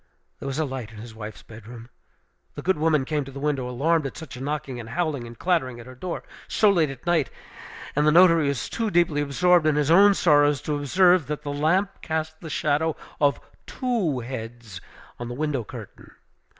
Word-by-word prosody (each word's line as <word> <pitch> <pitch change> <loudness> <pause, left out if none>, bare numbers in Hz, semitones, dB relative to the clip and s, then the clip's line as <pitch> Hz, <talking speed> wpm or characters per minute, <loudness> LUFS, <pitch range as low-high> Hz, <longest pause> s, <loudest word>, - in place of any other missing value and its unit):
There - - -6
was 135 0 -3
a 155 - +1
light 130 -5 -6
in 110 - -13
his 115 +1 -9
wife's 110 -1 -9
bedroom. 115 +1 -11 0.7
The - - -7
good 185 -3 +1
woman 155 -3 +2
came 150 0 -1
to 135 - -10
the 140 - -8
window, 140 -3 -1
alarmed 150 +4 +1
at - - -9
such 160 - -9
a 125 - -9
knocking, 140 -3 -4
and 115 -1 -8
howling, 145 -4 -2
and 115 0 -11
clattering 130 -9 0
at 115 - -10
her 130 - -11
door 170 +7 -5 0.2
so 210 -2 +4
late 165 -6 +2
at 135 +2 -10
night; 170 -5 +2 0.7
and 150 +1 +2
the - - +6
notary 165 -2 +6
was 140 -5 -2
too 225 -1 -2
deeply 170 -5 +2
absorbed 170 +3 +3
in 155 - +3
his 150 +1 +1
own 200 +3 +7
sorrows 145 -4 +4
to 150 - -1
observe 175 +2 +3
that 150 0 -4
the 145 -1 -3
lamp 175 +7 0
cast 160 0 -3
the 165 - -7
shadow 155 +2 0 0.2
of 145 -2 +3 0.3
two 215 - -1
heads 115 -5 -7 0.4
on 120 - -5
the 120 - -6
window 145 -3 -1
curtain. - - -11
145 Hz, 205 wpm, -25 LUFS, 130-165 Hz, 0.7 s, own